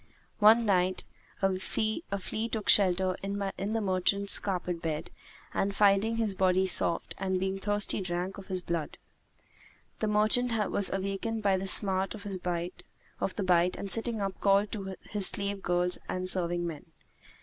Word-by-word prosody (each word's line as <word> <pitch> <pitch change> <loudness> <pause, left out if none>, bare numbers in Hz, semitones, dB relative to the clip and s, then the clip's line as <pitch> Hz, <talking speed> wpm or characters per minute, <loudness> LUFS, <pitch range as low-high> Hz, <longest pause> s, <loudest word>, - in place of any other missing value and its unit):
One 225 +2 +6
night, 185 -2 +1 0.4
a 190 -1 +1
flea 215 - -3
took 220 -3 -4
shelter 185 -1 +5
in 200 +1 -4
the 200 +2 -3
merchant's 200 +1 +2
carpet 180 -3 -3
bed 160 -1 -4 0.4
and, 195 0 -1
finding 205 +2 +3
his 220 -3 -1
body 185 0 +2
soft, 175 -2 +1
and 190 -1 -1
being 190 +1 -2
thirsty 205 0 0
drank 180 +2 -4
of 195 - -12
his 185 -2 -1
blood. 170 -3 -4 1.0
The 215 - -1
merchant 215 +1 +2
was 200 - +1
awakened 195 +3 -3
by 195 -2 +3
the 190 +1 -3
smart 190 0 +6
of 205 - -11
the 180 +1 -5
bite 180 -1 +2
and 200 - -6
sitting 225 -1 -1
up 195 -1 -4
called 200 +1 +2
to 195 -3 -5
his 205 -3 +2
slave 200 0 -3
girls 180 0 0
and 185 0 -3
serving 175 -2 0
men. 160 -4 -7
195 Hz, 150 wpm, -29 LUFS, 185-205 Hz, 1.0 s, One